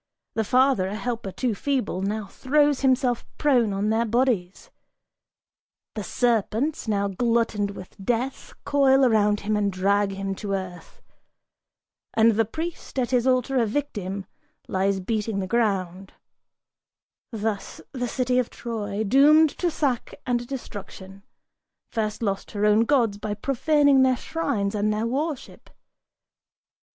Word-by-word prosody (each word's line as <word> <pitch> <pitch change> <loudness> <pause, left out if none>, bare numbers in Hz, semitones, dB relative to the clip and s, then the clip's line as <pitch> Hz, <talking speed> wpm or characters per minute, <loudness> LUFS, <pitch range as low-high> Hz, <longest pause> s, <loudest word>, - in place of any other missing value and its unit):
The 220 - 0
father, 255 -3 +3
A 200 - -4
helper 225 -2 -4
too 245 +3 -1
feeble, 230 -5 -2
now 210 +2 -2
throws 290 +6 +1
himself 255 -2 +2
prone 250 -7 +3
on 200 +2 0
their 225 +1 +2
bodies: 235 - -1 1.2
The 210 - -4
serpents, 240 +6 0
now 200 -2 +1
glutted 210 -1 0
with 185 - -11
death, 245 +5 -2
coil 270 -1 +4
around 210 -3 +3
him 215 +1 -1
and 205 -1 +1
drag 200 +2 +1
him 195 0 -3
To 200 -2 -4
earth! 180 -3 -8 1.1
And 225 +1 +5
the 225 +1 +2
priest, 320 +6 -6
at 250 -1 0
his 250 0 +2
altar 260 +1 +2
a 230 - +1
victim, 205 -7 -3 0.4
lies 190 +1 0
beating 215 +1 -2
The 195 - -1
ground. 195 -4 -1 1.2
Thus 220 -2 -3
the 245 -3 -3
city 250 +1 0
of 250 - -1
Troy, 215 -3 -4
doomed 290 +7 +5
to 355 - +1
sack 275 -7 -2
and 240 -1 -1
destruction, 195 -6 -8 0.7
First 215 0 -2
lost 195 -2 -2
her 205 0 0
own 210 +2 +4
gods 230 -7 +2
by 210 0 -3
profaning 280 +4 +3
their 260 -1 +3
shrines 245 -13 -2
and 210 0 0
their 215 +1 -1
worship. 285 +4 -4
225 Hz, 135 wpm, -24 LUFS, 200-260 Hz, 1.2 s, And